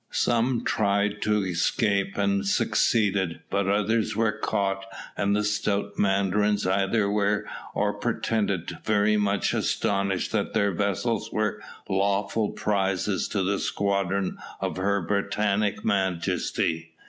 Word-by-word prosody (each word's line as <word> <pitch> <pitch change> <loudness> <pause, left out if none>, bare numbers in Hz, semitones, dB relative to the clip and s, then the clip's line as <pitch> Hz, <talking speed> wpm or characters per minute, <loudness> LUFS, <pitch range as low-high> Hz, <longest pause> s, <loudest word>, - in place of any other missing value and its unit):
Some 120 +1 +1
tried 100 0 +1
to 105 -2 +1
escape, 100 +3 0
and 100 0 +1
succeeded, 100 -4 +1
but 100 -1 +1
others 105 +2 +1
were 110 0 +2
caught, 100 -2 -1 0.3
and 100 0 +1
the 105 - +1
stout 100 -1 -1
mandarins 100 +1 +2
either 100 +3 +1
were 105 0 +1 0.3
or - - +1
pretended 100 -6 -1
to - - -5
be - - -22
very 105 0 +2
much 100 -1 +1
astonished 100 -2 0
that 105 -1 -1
their 100 -2 +3
vessels 100 +4 -1
were 105 -2 -1 0.3
lawful 100 +2 0
prizes 95 -1 0
to 100 -3 -1
the 100 +1 0
squadron 100 -1 -1 0.2
of - - -3
Her 100 0 0
Britannic 100 +1 0
Majesty. 85 -4 -1
100 Hz, 125 wpm, -26 LUFS, 95-105 Hz, 0.3 s, their